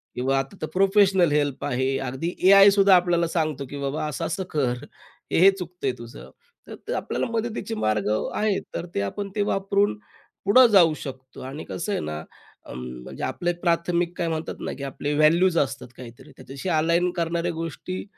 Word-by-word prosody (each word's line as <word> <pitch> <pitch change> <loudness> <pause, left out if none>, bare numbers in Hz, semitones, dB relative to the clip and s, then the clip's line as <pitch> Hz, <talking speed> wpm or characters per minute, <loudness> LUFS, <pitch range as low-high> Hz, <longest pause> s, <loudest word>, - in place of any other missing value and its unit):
किंवा 135 +2 0
आता 135 +8 -5
तर - - -2
प्रोफेशनल 195 -3 +4
हेल्प 145 -2 0
आहे. 130 0 0
अगदी 135 +7 -3
एआय 195 +1 +9
सुद्धा 195 -1 +5
आपल्याला 175 -1 +2
सांगतो 155 -4 -2
की 145 - -7
बाबा 140 +2 -2
असं-असं 165 +5 -3
कर 125 -5 -1 0.5
हे-हे 190 +3 +6
चुकतं 180 -5 -6
आहे 130 - +1
तुझं 120 +3 -11 0.4
तर 465 - -7
आपल्याला - - -2
मदतीचे 230 0 -3
मार्ग 110 - 0 0.3
आहेत 210 -2 0
तर - - -3
ते - - +1
आपण 200 - -4
ते 210 - 0
वापरून, 200 - 0 0.5
पुढं 250 +5 +7
जाऊ 170 -5 +6
शकतो 130 -3 -9
आणि 135 +4 -7
कसं 205 - -4
आहे - - -1
ना 75 0 -5 0.5
म - - -7 0.3
म्हणजे - - -8
आपले 175 0 -1
प्राथमिक 170 0 +1
काय 170 - -1
म्हणतात 160 0 -3
ना - - -3
की 140 - -7
आपले 140 +2 -3
व्हॅल्यूज 170 +3 +4
असतात 135 -3 -1
काहीतरी 120 -2 -12
त्याच्याशी 140 +7 -7
अलाइन 170 +2 +2
करणाऱ्या 170 +1 -1
गोष्टी 165 +3 -5
165 Hz, 170 wpm, -24 LUFS, 135-190 Hz, 0.5 s, एआय